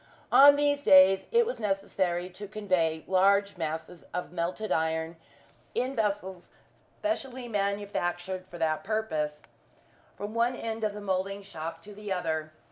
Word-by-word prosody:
On 285 Hz, +1 st, +9 dB
these 285 Hz, 0 st, +1 dB
days 190 Hz, -2 st, +7 dB
it 470 Hz, 0 st, +4 dB
was 485 Hz, -, -4 dB
necessary 190 Hz, -4 st, -1 dB
to 205 Hz, +3 st, -8 dB
convey 185 Hz, -6 st, 0 dB
large 200 Hz, +1 st, +3 dB
masses 160 Hz, 0 st, -5 dB
of 180 Hz, -, -3 dB
melted 180 Hz, +5 st, -3 dB
iron, 160 Hz, +1 st, 0 dB, 0.6 s
in 260 Hz, +2 st, -1 dB
vessels 200 Hz, -5 st, -2 dB, 0.5 s
specially 265 Hz, -6 st, -3 dB
manufactured 195 Hz, -3 st, -2 dB
for 175 Hz, -, -10 dB
that 155 Hz, -2 st, 0 dB
purpose, 155 Hz, -9 st, -2 dB, 0.7 s
from 205 Hz, +1 st, -6 dB
one 235 Hz, +2 st, +1 dB
end 225 Hz, -2 st, -4 dB
of 210 Hz, -1 st, -1 dB
the 210 Hz, -, -6 dB
moulding 195 Hz, 0 st, -2 dB
shop 165 Hz, -3 st, -7 dB
to 210 Hz, -, -11 dB
the 205 Hz, 0 st, -7 dB
other. 160 Hz, -4 st, -2 dB
195 Hz, 140 wpm, -29 LUFS, 175-215 Hz, 0.7 s, On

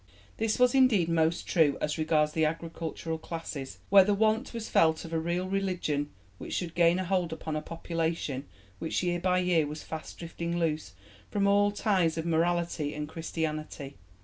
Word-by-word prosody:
This 220 Hz, -1 st, 0 dB
was 250 Hz, -1 st, +4 dB
indeed 245 Hz, -11 st, +4 dB
most 165 Hz, 0 st, +1 dB
true 155 Hz, -5 st, +3 dB
as 150 Hz, +2 st, -2 dB
regards 155 Hz, -1 st, +2 dB
the 160 Hz, +1 st, 0 dB
agricultural 165 Hz, 0 st, -3 dB
classes, 160 Hz, -5 st, -6 dB
where 195 Hz, -1 st, +9 dB
the 205 Hz, +1 st, +2 dB
want 220 Hz, +4 st, +1 dB
was 230 Hz, -2 st, -5 dB
felt 160 Hz, 0 st, +3 dB
of 165 Hz, -, -8 dB
a 165 Hz, -, +1 dB
real 170 Hz, +3 st, -1 dB
religion 180 Hz, -7 st, -1 dB, 0.3 s
which -, -, -5 dB
should 170 Hz, -3 st, -3 dB
gain 170 Hz, 0 st, +4 dB
a 185 Hz, -, -2 dB
hold 180 Hz, -2 st, 0 dB
upon 160 Hz, -1 st, -4 dB
a 155 Hz, -, -1 dB
population 165 Hz, -4 st, -3 dB, 0.3 s
which 160 Hz, -, -1 dB
year 175 Hz, -1 st, 0 dB
by 185 Hz, +1 st, +2 dB
year 180 Hz, -4 st, +2 dB
was 150 Hz, +1 st, -7 dB
fast 160 Hz, -1 st, -7 dB
drifting 170 Hz, 0 st, -4 dB
loose 160 Hz, -2 st, -1 dB, 0.4 s
from 200 Hz, -1 st, 0 dB
all 205 Hz, +1 st, +4 dB
ties 190 Hz, -5 st, +1 dB
of 160 Hz, -, -2 dB
morality 170 Hz, -2 st, 0 dB
and 150 Hz, 0 st, -4 dB
Christianity. 155 Hz, -4 st, -4 dB
165 Hz, 175 wpm, -29 LUFS, 160-185 Hz, 0.4 s, where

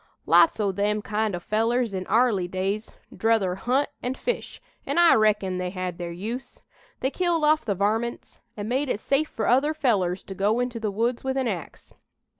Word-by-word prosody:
Lots 325 Hz, -, +5 dB
o' 205 Hz, -2 st, +1 dB
them 205 Hz, +2 st, -1 dB
kind 210 Hz, -1 st, -1 dB
o' -, -, -4 dB
fellers 225 Hz, +4 st, 0 dB
in 185 Hz, -1 st, -4 dB
'arly 220 Hz, -5 st, +2 dB
days, 195 Hz, +4 st, -3 dB, 0.2 s
'druther 220 Hz, -5 st, +2 dB
hunt 250 Hz, +10 st, 0 dB
and 255 Hz, +1 st, -3 dB
fish, 485 Hz, -, -3 dB, 0.2 s
an' -, -, -3 dB
I 345 Hz, -1 st, +7 dB
reckon 210 Hz, -4 st, +2 dB
they 180 Hz, 0 st, -2 dB
had 180 Hz, -2 st, -5 dB
their 175 Hz, -1 st, -4 dB
use. 220 Hz, +9 st, -6 dB, 0.4 s
They 265 Hz, -, 0 dB
killed 340 Hz, -3 st, +1 dB
off 305 Hz, -2 st, +3 dB
the 205 Hz, -4 st, 0 dB
varmints 220 Hz, +5 st, -2 dB, 0.2 s
an' 205 Hz, 0 st, -4 dB
made 265 Hz, +4 st, 0 dB
it 205 Hz, -, -1 dB
safe 280 Hz, +6 st, 0 dB
fur 220 Hz, -, -3 dB
other 280 Hz, +6 st, +3 dB
fellers 195 Hz, -, +1 dB
to 195 Hz, -, -8 dB
go 205 Hz, +5 st, +1 dB
into 245 Hz, -1 st, -2 dB
the 220 Hz, -1 st, -1 dB
woods 230 Hz, +4 st, -1 dB
with 265 Hz, 0 st, -1 dB
an 260 Hz, -2 st, 0 dB
ax. 180 Hz, -8 st, -6 dB
220 Hz, 195 wpm, -25 LUFS, 195-255 Hz, 0.4 s, I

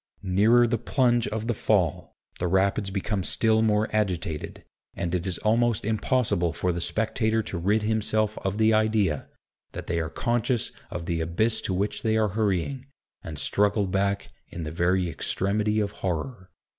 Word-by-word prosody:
Nearer 105 Hz, +6 st, +4 dB
the 120 Hz, -1 st, 0 dB
plunge 120 Hz, -3 st, +2 dB
of 110 Hz, 0 st, -3 dB
the 120 Hz, -, 0 dB
Fall, 95 Hz, -7 st, 0 dB, 0.2 s
the 90 Hz, -, 0 dB
Rapids 95 Hz, +2 st, +1 dB
become 100 Hz, +1 st, -2 dB
still 110 Hz, +3 st, +2 dB
more 110 Hz, 0 st, +2 dB
agitated; 90 Hz, -7 st, -2 dB, 0.3 s
and 85 Hz, 0 st, -3 dB
it 90 Hz, +1 st, -1 dB
is 90 Hz, -, -2 dB
almost 115 Hz, 0 st, +1 dB
impossible 110 Hz, -, +1 dB
for 90 Hz, +2 st, -1 dB
the 85 Hz, 0 st, -3 dB
spectator 110 Hz, +2 st, 0 dB
to 95 Hz, -, -4 dB
rid 105 Hz, +5 st, +1 dB
himself 110 Hz, 0 st, +1 dB
of 95 Hz, +1 st, -3 dB
the 110 Hz, 0 st, +4 dB
idea, 110 Hz, -8 st, +1 dB, 0.4 s
that -, -, -6 dB
they 85 Hz, -, -1 dB
are 80 Hz, -1 st, -2 dB
conscious 120 Hz, +3 st, -1 dB, 0.2 s
of 85 Hz, -1 st, -5 dB
the 85 Hz, -2 st, -1 dB
abyss 90 Hz, +8 st, +1 dB
to 95 Hz, -, -2 dB
which 100 Hz, +3 st, -1 dB
they 110 Hz, 0 st, +1 dB
are 110 Hz, -1 st, +2 dB
hurrying, 110 Hz, +6 st, -1 dB, 0.3 s
and 80 Hz, -2 st, -7 dB
struggle 100 Hz, +7 st, +1 dB
back 100 Hz, +1 st, -1 dB, 0.2 s
in 85 Hz, -, -7 dB
the 75 Hz, -, -5 dB
very 90 Hz, +2 st, +1 dB
extremity 105 Hz, +5 st, 0 dB
of 100 Hz, -1 st, -1 dB
horror. 95 Hz, +3 st, -4 dB
105 Hz, 170 wpm, -26 LUFS, 90-110 Hz, 0.4 s, Nearer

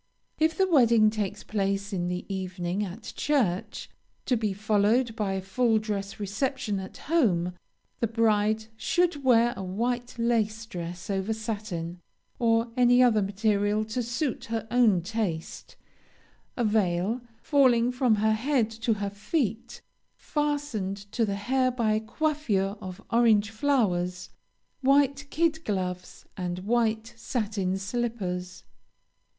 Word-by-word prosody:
If 320 Hz, +1 st, +2 dB
the 380 Hz, -, +3 dB
wedding 235 Hz, -9 st, +5 dB
takes 210 Hz, -3 st, -3 dB
place 200 Hz, 0 st, -1 dB
in 175 Hz, -2 st, -1 dB
the 180 Hz, 0 st, -3 dB
evening 185 Hz, 0 st, -3 dB
at 205 Hz, +4 st, -7 dB
church, 235 Hz, -12 st, 0 dB, 0.4 s
to 250 Hz, -, +2 dB
be 215 Hz, -3 st, 0 dB
followed 215 Hz, +4 st, +2 dB
by 205 Hz, -3 st, -1 dB
a 190 Hz, -, -2 dB
full 225 Hz, +3 st, +2 dB
dress 205 Hz, -2 st, -3 dB
reception 210 Hz, +1 st, -2 dB
at 190 Hz, 0 st, -8 dB
home, 190 Hz, -, +1 dB, 0.5 s
the 230 Hz, -, +1 dB
bride 220 Hz, -1 st, +2 dB
should 345 Hz, +4 st, 0 dB
wear 240 Hz, -2 st, +4 dB
a -, -, -6 dB
white 240 Hz, +6 st, -2 dB
lace 225 Hz, -2 st, 0 dB
dress 175 Hz, -3 st, -6 dB
over 195 Hz, +3 st, -1 dB
satin, 205 Hz, -6 st, -4 dB, 0.4 s
or 230 Hz, 0 st, +2 dB
any 245 Hz, 0 st, +5 dB
other 225 Hz, -4 st, +4 dB
material 205 Hz, +1 st, +1 dB
to 250 Hz, -, 0 dB
suit 240 Hz, +4 st, -2 dB
her 225 Hz, -1 st, -3 dB
own 220 Hz, -8 st, +4 dB
taste, 190 Hz, -5 st, -4 dB, 0.8 s
a 245 Hz, -, +1 dB
veil, 210 Hz, +1 st, +1 dB, 0.2 s
falling 250 Hz, -4 st, +3 dB
from 250 Hz, -3 st, +2 dB
her 220 Hz, +1 st, +2 dB
head 235 Hz, 0 st, +1 dB
to 225 Hz, +1 st, 0 dB
her 200 Hz, -1 st, -3 dB
feet, 235 Hz, -, -2 dB, 0.3 s
fastened 290 Hz, -10 st, -2 dB
to 230 Hz, -, +1 dB
the 200 Hz, -, -1 dB
hair 255 Hz, +5 st, +1 dB
by 235 Hz, -3 st, 0 dB
a 215 Hz, -, +2 dB
coiffure 220 Hz, -6 st, -1 dB
of 185 Hz, +2 st, -8 dB
orange 220 Hz, -3 st, +4 dB
flowers; 185 Hz, -8 st, 0 dB, 0.5 s
white 280 Hz, +1 st, +3 dB
kid 325 Hz, 0 st, +1 dB
gloves, 180 Hz, -, -4 dB
and 180 Hz, -2 st, -3 dB
white 220 Hz, +2 st, 0 dB
satin 205 Hz, -6 st, -2 dB
slippers. 195 Hz, -4 st, -3 dB
220 Hz, 135 wpm, -27 LUFS, 195-240 Hz, 0.8 s, wedding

